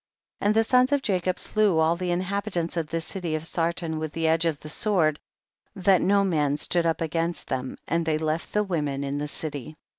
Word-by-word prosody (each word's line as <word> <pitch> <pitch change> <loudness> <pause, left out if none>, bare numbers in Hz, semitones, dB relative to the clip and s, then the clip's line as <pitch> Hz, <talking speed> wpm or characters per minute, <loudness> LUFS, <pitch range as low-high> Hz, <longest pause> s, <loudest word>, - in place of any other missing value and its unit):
51. - - 0
And 210 - +3
the 225 - +5
sons 255 +3 +3
of 285 -1 +2
Jacob 185 -4 0
slew 210 -5 +2
all 160 +1 +3
the 180 +1 -3
inhabitants 185 -1 -1
of 165 -2 -1
the 165 +2 -2
city 170 -1 -3
of 155 +1 -4
Sar 165 0 0
ton 165 -2 -4
with 155 -1 -4
the 165 -1 0
edge 160 +1 +3
of 160 -3 0
the - - -9
sword, 155 -3 +2 0.6
that 190 -1 +3
no 200 +1 +3
man 150 -6 +1
stood 170 +2 +1
up 165 - 0
against 165 +1 -2
them, 130 0 -3
and 170 +2 +1
they 160 -1 +1
left 155 +1 -2
the 210 - +2
women 150 -7 -2
in 140 +1 -2
the 150 - -3
city. 150 -1 -5
165 Hz, 220 wpm, -26 LUFS, 155-190 Hz, 0.6 s, the